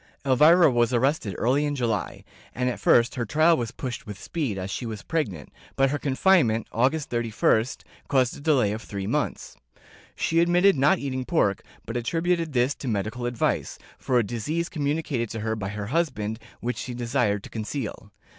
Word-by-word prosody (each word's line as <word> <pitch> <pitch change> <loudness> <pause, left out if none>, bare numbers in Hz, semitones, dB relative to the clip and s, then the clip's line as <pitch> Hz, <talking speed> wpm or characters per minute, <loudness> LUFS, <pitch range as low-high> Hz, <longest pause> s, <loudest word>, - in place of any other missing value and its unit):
Elvira 155 +5 +6
was 120 0 +2
arrested 125 - 0
early 135 +5 +2
in 145 -1 -1
July, 115 -5 -2 0.3
and 125 +1 0
at 110 - -7
first 120 +4 +4
her 125 - -2
trial 155 +8 +4
was 120 -6 -2
pushed 120 -1 -6
with 105 -2 -7
speed, 135 - -3
as 95 +1 -4
she 120 - -4
was 110 -2 -6
pregnant, 100 - -3 0.3
but 135 0 +3
her 145 - -1
confinement, 130 - +3
August 135 +6 0
31st, 115 0 +1 0.2
caused 130 -3 +2
a - - -10
delay 140 -9 +2
of 110 +1 -4
three 100 -3 -6
months. - - -2 0.6
She 165 - +1
admitted 175 +3 +4
not 145 +8 +4
eating 130 -3 -3
pork, 125 - +1 0.2
but 115 - -6
attributed 165 +5 0
this 125 +2 +2
to 135 - -7
medical 110 +3 -2
advice, 120 -1 -1 0.2
for 125 - +1
a 120 - +4
disease 150 +11 -3
communicated 145 - -2
to 110 - -5
her 110 0 -1
by 100 -3 -4
her 105 0 -5
husband, 120 -6 -1 0.2
which 125 +1 -2
she 125 - -5
desired 120 -4 0
to - - -11
conceal. 110 -2 -5
125 Hz, 180 wpm, -25 LUFS, 110-150 Hz, 0.6 s, Elvira